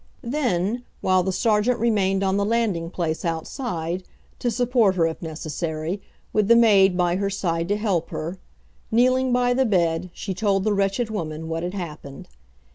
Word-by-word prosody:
Then, 235 -4 -1 0.2
while 185 0 +3
the 190 +1 -1
sergeant 220 +4 +2
remained 195 -4 +1
on 190 0 +1
the 200 - +1
landing 205 -6 0
place, 165 -2 -2
outside, 170 - -3 0.4
to 245 - 0
support 235 -4 +2
her, 170 -2 +3
if 165 0 -3
necessary, 160 +2 -4 0.3
with 210 -2 +2
the 235 - +7
maid 200 -5 +5
by 175 0 +2
her 200 0 0
side 170 -4 -1
to 205 +2 +1
help 200 -6 -1
her, 170 +4 -5 0.5
kneeling 255 +3 +3
by 245 0 +3
the 265 +2 +2
bed, 180 -5 +1
she 190 +2 -5
told 195 0 +1
the 215 0 +1
wretched 200 +3 0
woman 160 -5 -4
what 165 0 -2
had 180 +3 -4
happened. 150 -6 -7
195 Hz, 170 wpm, -23 LUFS, 170-225 Hz, 0.5 s, the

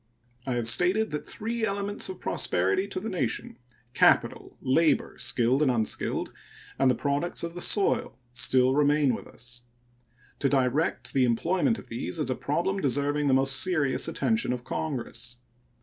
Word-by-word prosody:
I 130 - -1
have 120 -2 -1
stated 180 - +3
that 150 - -5
three 230 +1 -4
elements 200 0 -2
of 185 -1 -7
prosperity 95 - 0
to 195 - -4
the 215 - -6
nation 135 - -3 0.4
capital, - - +2
labor, 155 +5 +1
skilled 125 +4 +2
and 150 - +3
unskilled, 115 -3 -1 0.5
and 130 -2 +3
products 145 +5 -1
of 170 0 -4
the 175 - -7
soil 195 - +2 0.2
still 125 +1 +3
remain 145 -1 +3
with - - -6
us. 120 0 -9 0.8
To 140 - +1
direct 135 +3 0
the 130 -2 +3
employment 170 - +1
of - - -11
these 90 -6 -4
is 130 - -1
a - - 0
problem 175 +10 -1
deserving 145 0 0
the 130 - +4
most 135 0 +4
serious 155 -8 +1
attention 225 - 0
of 125 -1 -5
Congress. 125 -4 -4
140 Hz, 155 wpm, -27 LUFS, 125-180 Hz, 0.8 s, the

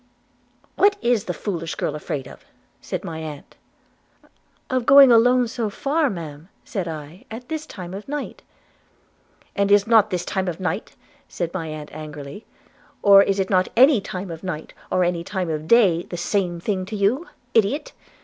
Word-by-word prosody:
'What 405 0 +4
is 235 -4 +2
the - - -2
foolish 170 -3 -4
girl - - -2
afraid 140 -3 -5
of?' - - -13 0.4
said - - -5
my 160 -1 -6
aunt. 155 -3 -8 1.1
'Of 255 -3 -1
going 275 -1 +9
alone 245 +2 +5
so 225 -1 -3
far, 285 +7 0
Ma'am,' 165 -3 -8 0.2
said 190 -5 -4
I, 155 +2 -8
'at 235 +3 -9
this 315 -1 -4
time 180 -3 -8
of 200 +2 -8
night.' 290 0 -5 1.1
'And 200 0 +1
is 205 -1 +5
not 220 -2 +5
this 180 -3 -2
time 190 -1 -2
of 175 -1 -3
night,' 185 - -3 0.3
said 170 -2 -4
my 165 -4 -3
aunt 155 -1 -8
angrily, 150 +3 -9 0.6
'or 200 -1 +8
is 195 -1 +1
not 185 -1 +3
any 260 -2 +6
time 185 -1 -6
of 165 -1 -8
night, 175 -5 -5 0.2
or 185 - +2
any 175 -1 -1
time 180 -2 -3
of 155 0 -4
day, 195 -7 +5
the 175 - -8
same 175 -1 -1
thing 190 +1 -2
to 215 - -5
you? 215 - +1 0.3
Idiot! 235 - +1
190 Hz, 170 wpm, -22 LUFS, 170-230 Hz, 1.1 s, going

